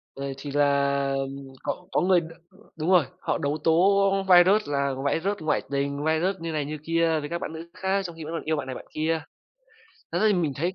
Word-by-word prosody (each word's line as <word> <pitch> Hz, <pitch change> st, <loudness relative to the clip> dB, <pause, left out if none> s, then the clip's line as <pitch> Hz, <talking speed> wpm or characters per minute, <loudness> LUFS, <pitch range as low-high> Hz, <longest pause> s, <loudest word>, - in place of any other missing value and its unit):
Rồi 140 Hz, 0 st, -4 dB
thì 140 Hz, +1 st, -7 dB
là, 140 Hz, -1 st, +2 dB
ừm, 135 Hz, 0 st, -5 dB
có 180 Hz, -, -4 dB
có -, -, +2 dB
người, 180 Hz, -1 st, +4 dB
đ -, -, -7 dB, 0.5 s
đúng 160 Hz, +3 st, -2 dB
rồi, 180 Hz, -7 st, +5 dB
họ -, -, -1 dB
đấu 145 Hz, +1 st, -1 dB
tố 165 Hz, -, +4 dB, 0.6 s
Viruss 185 Hz, +3 st, +6 dB
là 140 Hz, -1 st, 0 dB, 0.2 s
Viruss 200 Hz, +5 st, -1 dB
ngoại 155 Hz, -1 st, +1 dB
tình, 140 Hz, +1 st, -1 dB
Viruss 170 Hz, +5 st, +1 dB
như 165 Hz, 0 st, -4 dB
này, 150 Hz, -2 st, -1 dB
như 155 Hz, +1 st, -5 dB
kia 165 Hz, -1 st, +2 dB
với 145 Hz, 0 st, -6 dB
các 170 Hz, +1 st, -3 dB
bạn 160 Hz, -, -5 dB
nữ 165 Hz, +1 st, -8 dB
khác 190 Hz, +1 st, 0 dB
trong 170 Hz, -2 st, -6 dB
khi 165 Hz, -, -8 dB
vẫn 155 Hz, +2 st, -6 dB
còn 165 Hz, -, -3 dB
yêu 160 Hz, +1 st, 0 dB
bạn 145 Hz, -3 st, -4 dB
này, 130 Hz, -, -5 dB
bạn -, -, -9 dB
kia. 160 Hz, +1 st, 0 dB, 0.9 s
Thật -, -, 0 dB
ra -, -, +1 dB
thì 210 Hz, -, +4 dB
mình 165 Hz, -6 st, 0 dB
thấy 170 Hz, +5 st, -1 dB
c -, -, -24 dB
160 Hz, 240 wpm, -26 LUFS, 140-175 Hz, 0.9 s, Viruss